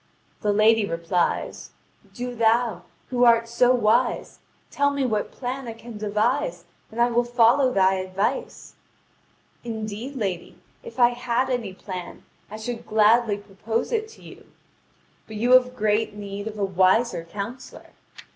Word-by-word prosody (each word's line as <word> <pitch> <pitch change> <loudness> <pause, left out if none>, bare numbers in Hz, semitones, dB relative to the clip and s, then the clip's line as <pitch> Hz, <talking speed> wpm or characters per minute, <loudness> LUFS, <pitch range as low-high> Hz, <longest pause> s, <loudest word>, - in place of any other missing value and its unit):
The 210 - +1
lady 215 +2 +4
replies: 170 -1 -2 0.4
"Do 245 0 -5
thou, 225 -4 +1 0.3
who 245 -1 +2
art 230 -1 +5
so 245 +2 +3
wise, 235 0 +1 0.3
tell 285 0 +2
me 280 -1 -1
what 215 -4 -1
plan 255 0 -5
I 230 - -5
can 230 -1 -11
devise, 215 - -1 0.3
and 225 - -8
I 240 +1 +3
will 240 +1 +2
follow 245 +2 +3
thy 190 -3 +3
advice." 190 - -3 0.9
"Indeed, 225 +3 -5
lady, 195 -8 -4 0.2
if 470 -1 -11
I 240 -1 +7
had 245 +1 -1
any 225 -7 -3
plan, 185 -3 -8 0.2
I 215 - -7
should 230 +2 -6
gladly 215 0 +3
propose 210 - -4
it 440 -2 -1
to - - -18
you. - - -14 0.8
But 220 - -9
you 235 +4 0
have 255 0 +5
great 215 -2 0
need 200 0 -6
of 215 -1 -6
a 200 - 0
wiser 190 +2 +2
counsellor. 205 +8 -8
225 Hz, 145 wpm, -24 LUFS, 205-245 Hz, 0.9 s, I